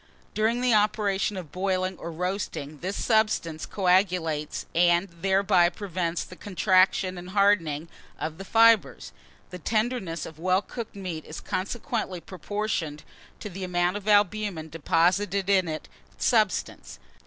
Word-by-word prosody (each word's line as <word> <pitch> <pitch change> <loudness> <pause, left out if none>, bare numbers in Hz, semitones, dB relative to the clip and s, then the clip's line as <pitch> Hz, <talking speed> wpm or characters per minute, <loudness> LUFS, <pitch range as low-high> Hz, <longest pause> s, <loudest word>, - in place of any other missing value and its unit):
During 225 +3 +1
the 250 -2 +3
operation 210 -2 +1
of 175 -5 -7
boiling 185 0 -1
or 170 - -6
roasting, 165 -4 -4
this 190 +3 -3
substance 215 -8 +1
coagulates, 180 -5 +1
and 175 +2 +3
thereby 190 0 +3
prevents 175 -2 -3
the 185 - -12
contraction 185 -1 +2
and 180 +1 -9
hardening 185 -6 +2 0.3
of 160 +2 -4
the - - -5
fibres. 215 - +3 0.4
The 180 - -7
tenderness 215 -5 -1
of 160 -1 -11
well 185 +3 +2
cooked 230 -1 -7
meat 180 -5 -5
is 155 - -8
consequently 215 -1 -3
proportioned 185 -4 -4 0.4
to - - -5
the 190 +2 -6
amount 180 0 0
of 205 0 -6
albumen 205 -5 +2
deposited 180 +5 +1
in 190 -3 +3
its 155 -1 -5 0.3
substance. 215 -5 0
185 Hz, 130 wpm, -26 LUFS, 170-205 Hz, 0.4 s, the